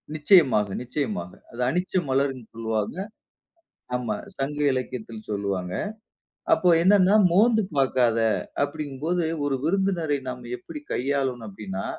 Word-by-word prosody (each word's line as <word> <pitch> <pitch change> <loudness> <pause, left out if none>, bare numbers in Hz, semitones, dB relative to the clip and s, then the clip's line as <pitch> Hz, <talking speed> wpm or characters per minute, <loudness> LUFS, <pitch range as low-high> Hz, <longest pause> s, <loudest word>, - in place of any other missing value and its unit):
நிச்சயமாக, 145 - +5
நிச்சயமாக! 115 - -3 0.2
அத 120 - -11
அனிச்ச 180 +5 -2 0.2
மலர் 135 +1 +2
என்று 125 -4 -12
சொல்வாங்க. 110 - -2 1.0
ஆமா, 120 -4 -1 0.2
சங்க 140 +2 -3
இலக்கியத்தில் 115 -4 -5
சொல்லுவாங்க. 100 -3 -2 0.8
அப்போ 180 - +3
என்னன்னா 195 +1 +5 0.2
மோந்து 220 +4 +4
பாக்காத! 125 -4 +3 0.4
அப்படிங்கும் 145 -1 -5
போது 175 0 +1 0.2
ஒரு 140 -1 +1
விருந்தினரை 170 -4 +1
நாம் 125 -1 -6
எப்படி 300 +11 -9
கையாளனும் 130 -3 -1
அப்படினா, 95 -1 -6
135 Hz, 115 wpm, -25 LUFS, 115-160 Hz, 1.0 s, நிச்சயமாக